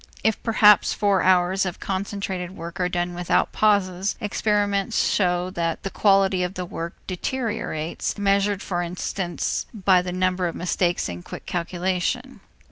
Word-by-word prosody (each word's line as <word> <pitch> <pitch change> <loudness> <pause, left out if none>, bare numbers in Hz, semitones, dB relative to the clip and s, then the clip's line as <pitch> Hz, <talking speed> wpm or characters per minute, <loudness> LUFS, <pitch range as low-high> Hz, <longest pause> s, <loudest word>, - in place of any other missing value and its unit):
If 220 -1 +1
perhaps 210 -3 +5
four 200 -3 +2
hours 185 +1 +3
of 185 -3 -4
concentrated 190 -1 -4
work 170 +2 -7
are 180 -1 +1
done 175 0 -2
without 175 0 +1
pauses, 195 -2 +1
experiment 205 -2 0
shows 180 -1 +1
that 165 -2 -2
the 195 - -3
quality 195 -2 +3
of 180 +2 -2
the 180 - -3
work 170 0 -6
deteriorates, 205 -6 -3
measured 200 0 +1
for 175 -2 -2
instance 175 +1 -3
by 190 -3 +4
the 180 0 -4
number 185 0 0
of 170 - -5
mistakes 175 0 0
in 85 0 -6
quick - - -9
calculation. 185 +9 -2
185 Hz, 145 wpm, -24 LUFS, 175-200 Hz, -, perhaps